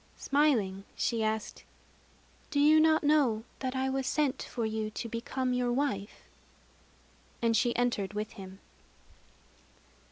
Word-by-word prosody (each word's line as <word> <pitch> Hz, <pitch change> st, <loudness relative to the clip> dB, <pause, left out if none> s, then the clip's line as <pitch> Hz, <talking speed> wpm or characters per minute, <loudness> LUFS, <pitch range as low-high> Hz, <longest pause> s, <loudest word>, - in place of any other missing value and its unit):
Smiling, 230 Hz, -10 st, +1 dB
she 230 Hz, -2 st, 0 dB
asked: 220 Hz, 0 st, -3 dB, 0.9 s
"Do 285 Hz, -, 0 dB
you 305 Hz, +2 st, +6 dB
not 315 Hz, 0 st, +4 dB
know 280 Hz, -7 st, +3 dB, 0.2 s
that 260 Hz, -1 st, -3 dB
I 260 Hz, 0 st, 0 dB
was 265 Hz, 0 st, -1 dB
sent 290 Hz, -4 st, 0 dB
for 230 Hz, -3 st, -3 dB
to 220 Hz, +1 st, -4 dB
become 250 Hz, +3 st, -2 dB
your 250 Hz, -1 st, 0 dB
wife?" 240 Hz, -6 st, -2 dB, 1.2 s
And 230 Hz, -1 st, +2 dB
she 240 Hz, +1 st, +2 dB
entered 230 Hz, -5 st, 0 dB
with 210 Hz, +1 st, -3 dB
him. 190 Hz, -3 st, -10 dB
245 Hz, 125 wpm, -30 LUFS, 215-275 Hz, 1.2 s, you